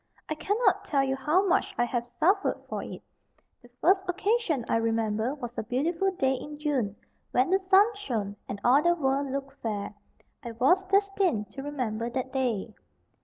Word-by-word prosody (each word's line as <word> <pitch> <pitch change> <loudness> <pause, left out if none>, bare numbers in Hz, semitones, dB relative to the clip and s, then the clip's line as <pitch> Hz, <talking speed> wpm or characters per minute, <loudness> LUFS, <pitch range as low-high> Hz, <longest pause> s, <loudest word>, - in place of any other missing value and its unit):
I - - -1
cannot 410 +9 +1
tell 275 -2 +1
you 265 0 0
how 300 +9 +2
much 375 0 +1
I - - +3
have 240 0 -2
suffered 390 +4 +2
for - - -4
it. - - -8 0.6
The 245 - -18
first 380 +2 +4
occasion 375 - 0
I - - +2
remember 225 +2 0
was 240 -5 -6
a - - -2
beautiful 320 - 0
day 270 -8 +1
in 295 +3 -6
June, 270 -9 -1 0.3
when 255 +7 +2
the 385 - +4
sun 385 +1 +6
shone, 225 - -3
and 200 - -4
all 260 +4 +5
the 345 +2 +3
world 275 -3 0
looked 275 0 -5
fair. 210 -2 -3 0.5
I 235 - -6
was 275 +12 +3
destined 390 - +1
to 270 - -7
remember 240 -6 -3
that 260 +1 -4
day. 235 -5 -1
270 Hz, 175 wpm, -28 LUFS, 235-355 Hz, 0.6 s, sun